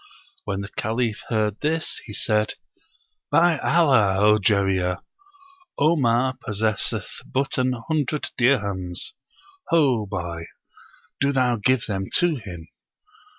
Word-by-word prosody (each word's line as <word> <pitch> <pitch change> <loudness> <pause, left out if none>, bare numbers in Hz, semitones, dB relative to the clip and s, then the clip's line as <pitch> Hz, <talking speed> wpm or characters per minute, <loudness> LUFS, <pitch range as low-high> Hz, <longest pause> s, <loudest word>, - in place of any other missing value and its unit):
When 100 -1 -2
the 100 - -6
Caliph 110 +1 -2
heard 110 -2 0
this, 155 +1 -1
he 105 - -8
said, 105 0 +1 0.7
"By 165 +1 +4
Allah, 130 - +3
O 105 +1 +5
Jarir! 95 -3 +1 0.8
Omar 130 -4 +2
possesseth 110 -2 -2
but 135 0 -2
an 130 0 +2
hundred 150 -1 -1
dirhams. 100 - 0 0.6
Ho 135 - +3
boy! 85 -4 -5 0.7
do 140 0 +2
thou 125 -3 +2
give 125 +3 +2
them 95 -2 -2
to 175 -4 +2
him!" 90 -7 -9
110 Hz, 110 wpm, -23 LUFS, 100-140 Hz, 0.8 s, O